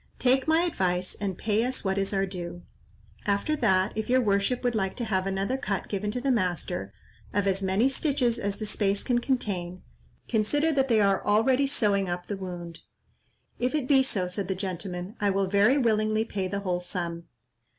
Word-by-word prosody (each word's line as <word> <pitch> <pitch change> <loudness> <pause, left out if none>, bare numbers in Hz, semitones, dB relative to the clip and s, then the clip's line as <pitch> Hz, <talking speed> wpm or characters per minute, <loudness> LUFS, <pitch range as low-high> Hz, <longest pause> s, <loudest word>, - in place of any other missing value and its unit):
Take 260 +2 +2
my 320 +2 +4
advice 185 - 0
and 195 -3 -4
pay 220 0 +1
us 255 -2 -3
what 190 0 +1
is 195 - -1
our 195 -1 +1
due. 175 -2 -7 0.6
After 200 +10 +1
that, 190 -5 +2
if 220 +1 -3
your 255 +1 +5
worship 205 +2 +1
would 245 -1 +1
like 195 -4 -1
to 240 - -3
have 190 -3 0
another 195 +6 -1
cut 200 -7 -3
given 205 0 -2
to 250 - -2
the 270 +2 +1
master, 175 - -1 0.4
of 205 -1 +2
as 195 0 +1
many 195 +6 +2
stitches 270 -4 +1
as 200 0 -2
the 215 - -4
space 200 -1 0
can 245 -2 +1
contain, 195 -9 -2 0.4
consider 290 +9 +2
that 270 -3 +2
they 225 -4 +4
are 195 -1 +2
already 255 +6 +3
sewing 200 -7 +1
up 175 0 -3
the 205 - -4
wound." 175 -3 -7 0.8
"If 250 +4 0
it 285 -4 -1
be 270 -1 +5
so," 200 -8 0
said 180 +1 -3
the 190 - -1
gentleman, 185 +1 -5
"I 205 - +2
will 195 0 +1
very 205 +8 +4
willingly 215 -3 +2
pay 195 -4 -3
the 200 +1 -3
whole 180 -2 -1
sum." 170 -2 -4
200 Hz, 195 wpm, -27 LUFS, 190-245 Hz, 0.8 s, your